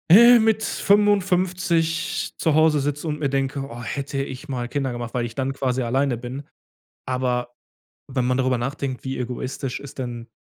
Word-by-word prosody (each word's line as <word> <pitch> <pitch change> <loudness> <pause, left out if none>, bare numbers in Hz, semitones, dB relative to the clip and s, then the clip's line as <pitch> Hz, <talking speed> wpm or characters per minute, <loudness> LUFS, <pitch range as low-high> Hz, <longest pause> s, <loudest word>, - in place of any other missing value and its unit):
Äh, 235 +7 +9
mit 220 -1 +2
55 180 -4 +1
zu 160 - +1
Hause 155 -1 +4
sitze 145 +3 -2
und 150 -1 -2
mir 145 - 0
denke: 135 0 -1
„Oh, 120 +1 -8
hätte 135 +3 -3
ich 135 +3 -8
mal 125 -3 -2
Kinder 135 +1 -2
gemacht“, 120 -1 -5
weil 120 -1 0
ich 115 -1 -8
dann 135 0 -1
quasi 130 -1 -1
alleine 130 +1 +1
bin. 125 +4 -6 0.6
Aber 125 -1 -1 0.5
wenn 130 -2 -1
man 125 0 +1
darüber 130 -1 +2
nachdenkt, 135 +1 -3
wie 130 0 -3
egoistisch 125 +1 -4
ist 140 0 -10
denn 120 -2 -5
135 Hz, 175 wpm, -23 LUFS, 125-160 Hz, 0.6 s, Äh